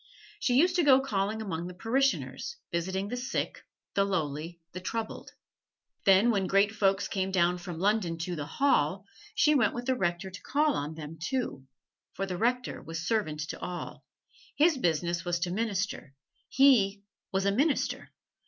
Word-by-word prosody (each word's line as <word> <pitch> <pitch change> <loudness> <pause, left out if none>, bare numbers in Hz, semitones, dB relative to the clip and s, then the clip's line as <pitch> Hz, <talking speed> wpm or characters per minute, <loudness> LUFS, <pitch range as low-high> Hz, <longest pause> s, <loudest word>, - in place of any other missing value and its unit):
She 245 - +1
used 350 +7 +4
to 350 - +4
go 270 -3 +7
calling 220 -4 -1
among 175 -4 -4
the 180 - -9
parishioners, 270 - 0
visiting 190 +4 -2
the 245 - -3
sick, 250 +1 -3 0.3
the 200 - +3
lowly, 165 -3 -2
the 185 - -6
troubled. 220 +4 -5 0.7
Then 200 +4 +6
when 195 -4 0
Great 200 +3 +3
Folks 195 -1 +2
came 190 -1 -1
down 180 -1 +2
from 175 -2 -7
London 190 -2 +1
to 175 +2 -3
"the 145 -2 -5
Hall," 280 +11 +1 0.3
she 300 - +4
went 240 -8 +3
with 240 0 -4
the 260 - +2
Rector 190 -4 -1
to 195 - -9
call 295 +2 +2
on 150 - -3
them 160 0 -8
too, 175 - -3 0.5
for 195 - -2
the 185 -2 -4
Rector 245 +6 -1
was 165 +1 -6
servant 175 -8 0
to - - -5
all 180 -1 -6 0.5
his 320 +2 +4
business 170 - 0
was 175 -1 0
to 175 0 -1
minister: 200 -8 -2 0.3
he 210 -8 +4 0.3
was 195 0 0
a 200 - +3
Minister. 280 +8 0
195 Hz, 170 wpm, -29 LUFS, 175-240 Hz, 0.7 s, go